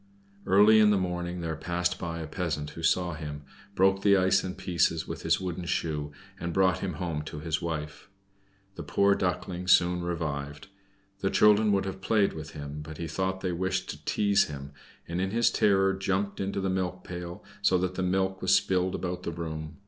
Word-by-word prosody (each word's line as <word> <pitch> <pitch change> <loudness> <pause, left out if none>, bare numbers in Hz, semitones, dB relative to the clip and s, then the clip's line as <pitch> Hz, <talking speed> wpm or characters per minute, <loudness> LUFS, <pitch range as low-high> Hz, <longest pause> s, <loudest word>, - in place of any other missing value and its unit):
Early 105 +3 +6
in 105 -1 +6
the 105 - +4
morning 90 -1 -3
there 80 -1 -3
passed 90 +2 -1
by 85 -2 -4
a - - -4
peasant 75 -3 -3
who 85 - -9
saw 85 +2 +2
him, 75 -2 -6 0.3
broke 95 +1 +3
the 100 -1 +5
ice 95 +1 +3
in 95 -1 -4
pieces 85 -2 0
with - - -6
his - - +2
wooden 90 -1 -4
shoe, 80 -4 -2 0.3
and 85 0 -3
brought 95 -1 +3
him 95 -2 -3
home 80 -1 -3
to 75 - -7
his 80 +1 -2
wife. 80 +1 -5 0.6
The - - -7
poor 100 0 +3
Duckling 90 -1 -2
soon 90 -1 +4
revived. 75 -2 -4 0.5
The 95 - 0
children 105 +2 +5
would 95 -1 +1
have 95 0 -5
played 105 -1 +2
with 80 -1 -8
him, 75 0 -6
but 80 +1 -9
he 85 - -4
thought 95 +3 -2
they 90 - -1
wished 95 +1 -1
to 75 +1 -11
tease 100 +4 +2
him, 70 -1 -8 0.4
and 85 +2 -2
in 95 - 0
his 115 +3 +2
terror 95 -2 +3
jumped 95 +1 -1
into 100 0 -2
the 95 - 0
milk 90 -1 -2
pail, 90 -1 -7 0.2
so 95 - +4
that 90 0 -1
the 95 - -3
milk 95 +1 0
was - - +4
spilled 95 0 +1
about 90 -1 -3
the 85 - -4
room. 80 -2 -6
90 Hz, 200 wpm, -28 LUFS, 80-95 Hz, 0.6 s, Early